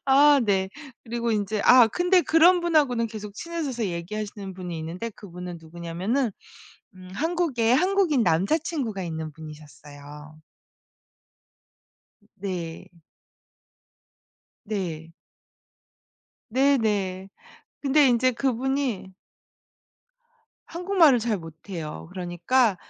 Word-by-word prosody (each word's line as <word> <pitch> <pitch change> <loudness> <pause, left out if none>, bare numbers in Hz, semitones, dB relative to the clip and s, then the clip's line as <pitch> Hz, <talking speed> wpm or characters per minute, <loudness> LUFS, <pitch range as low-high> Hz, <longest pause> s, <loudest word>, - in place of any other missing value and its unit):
아 280 +1 +6
네. 190 -2 +1 0.4
그리고 235 0 -2
인제 210 0 -1
아 250 -2 +8
근데 355 - +3
그런 345 +3 +5
분하고는 290 -9 +2
계속 210 -2 -8
친해져서 285 -8 -3
얘기하시는 195 +2 -5
분이 180 -2 -6
있는데 175 +9 -5
그 200 -4 -13
분은 180 -1 -7
누구냐면은 175 - -2 0.7
음 185 0 -13
한국에 295 - +1
한국인 360 - +2
남자친구가 210 - 0
있는 160 -2 -5
분이셨어요. 150 -1 -12 2.0
네. 180 -3 -5 1.8
네. 170 -6 -4 1.4
네 275 +4 +3
네. 195 -4 -1 0.5
근데 285 0 +4
인제 250 +1 +3
그분이 260 -5 -2 1.5
한국말을 340 -6 +3
잘 220 -2 0
못해요. 165 -1 -8
그러니까 185 +5 +1
215 Hz, 215 characters per minute, -25 LUFS, 175-270 Hz, 2.0 s, 아